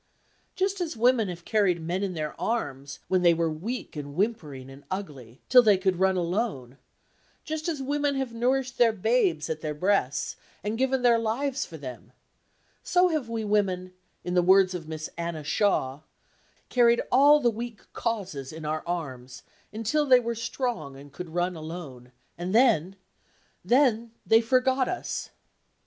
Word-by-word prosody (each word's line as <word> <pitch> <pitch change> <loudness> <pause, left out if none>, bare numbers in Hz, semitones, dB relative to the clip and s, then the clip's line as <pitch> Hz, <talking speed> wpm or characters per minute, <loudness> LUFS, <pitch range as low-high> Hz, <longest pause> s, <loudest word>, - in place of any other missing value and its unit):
Just 385 0 -1
as 330 -7 -3
women 235 -2 +3
have 175 -1 -7
carried 200 -6 +2
men 175 +4 -2
in 195 -3 -2
their 155 -1 -3
arms, 140 - -3
when 185 -1 +2
they 170 -1 +5
were 165 -1 0
weak 205 +11 -5
and 145 -1 -7
whimpering 155 - -2
and 135 +1 -13
ugly, 140 - -7
till 255 -1 +8
they 210 -4 +4
could 185 -1 0
run 190 0 +3
alone; 170 - -2 0.6
just 315 +1 -3
as 295 -5 -3
women 290 +1 0
have 265 -3 -3
nourished 255 +2 0
the 235 -2 +6
babes 200 -7 +1
at 155 -1 -4
their 150 -2 -3
breasts, 180 -5 0 0.3
and 215 +3 -3
given 265 -1 +1
their 235 -2 +5
lives 260 +5 -1
for 165 - -9
them, 130 -5 -9 0.7
so 360 0 +3
have 305 -8 -2
we 225 -1 -3
women 185 -3 0 0.3
(in 180 - -3
the 180 - +4
words 190 +1 +5
of 170 -3 -6
Miss 155 -1 -5
Anna 170 -2 -3
Shaw) 145 -5 0 0.7
"carried 235 -1 +4
all 285 +4 +6
the 240 -4 +2
weak 230 -1 -7
causes 190 - -3
in 160 0 -8
our 155 +1 -2
arms, 130 -8 -5 0.3
until 230 +8 0
they 255 -2 +7
were 235 -1 -2
strong 230 - -3
and 140 +1 -13
could 180 +2 -7
run 175 +2 -1
alone, 155 -6 -8 0.3
and 180 +4 -2
then—then—they 230 - +1
forgot 260 +2 +2
us!" 365 - -4
195 Hz, 160 wpm, -27 LUFS, 160-240 Hz, 0.7 s, till